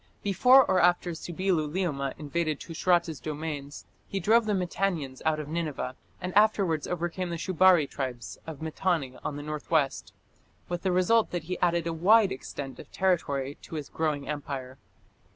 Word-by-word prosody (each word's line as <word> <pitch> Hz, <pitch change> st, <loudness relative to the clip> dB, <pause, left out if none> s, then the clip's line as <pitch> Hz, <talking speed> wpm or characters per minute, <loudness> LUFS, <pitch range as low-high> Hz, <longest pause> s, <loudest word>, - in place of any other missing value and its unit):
Before 250 Hz, +7 st, +6 dB
or 185 Hz, -1 st, +3 dB
after 175 Hz, 0 st, +3 dB
Subbi 175 Hz, +4 st, -2 dB
luliuma 155 Hz, -4 st, -1 dB
invaded 155 Hz, 0 st, -2 dB
Tushratta's 170 Hz, -2 st, 0 dB
domains, 150 Hz, -2 st, -5 dB, 0.2 s
he 195 Hz, -, -3 dB
drove 220 Hz, +4 st, +3 dB
the 210 Hz, -, +1 dB
Mitannians 175 Hz, -7 st, -2 dB
out 155 Hz, -1 st, +2 dB
of 150 Hz, -, -5 dB
Nineveh, 155 Hz, -5 st, -3 dB, 0.2 s
and 180 Hz, 0 st, -4 dB
afterwards 195 Hz, -7 st, +3 dB
overcame 175 Hz, +1 st, -2 dB
the 170 Hz, -, -3 dB
Shubari 185 Hz, -2 st, +4 dB
tribes 130 Hz, -4 st, -5 dB
of 160 Hz, -1 st, -7 dB
Mitanni 160 Hz, -5 st, -1 dB
on 145 Hz, -, -3 dB
the 145 Hz, -, -6 dB
north 150 Hz, 0 st, -6 dB
west, 150 Hz, -5 st, +1 dB, 0.6 s
with 175 Hz, 0 st, -3 dB
the 190 Hz, -, 0 dB
result 185 Hz, +5 st, +3 dB
that 175 Hz, -2 st, -3 dB
he 180 Hz, +3 st, -4 dB
added 170 Hz, -1 st, +2 dB
a 165 Hz, -, -1 dB
wide 200 Hz, +5 st, +5 dB
extent 135 Hz, +1 st, -6 dB
of -, -, -12 dB
territory 145 Hz, -7 st, 0 dB
to -, -, -9 dB
his 150 Hz, -3 st, -5 dB
growing 150 Hz, -3 st, -2 dB
empire. 135 Hz, -3 st, -5 dB
165 Hz, 165 wpm, -28 LUFS, 145-185 Hz, 0.6 s, Before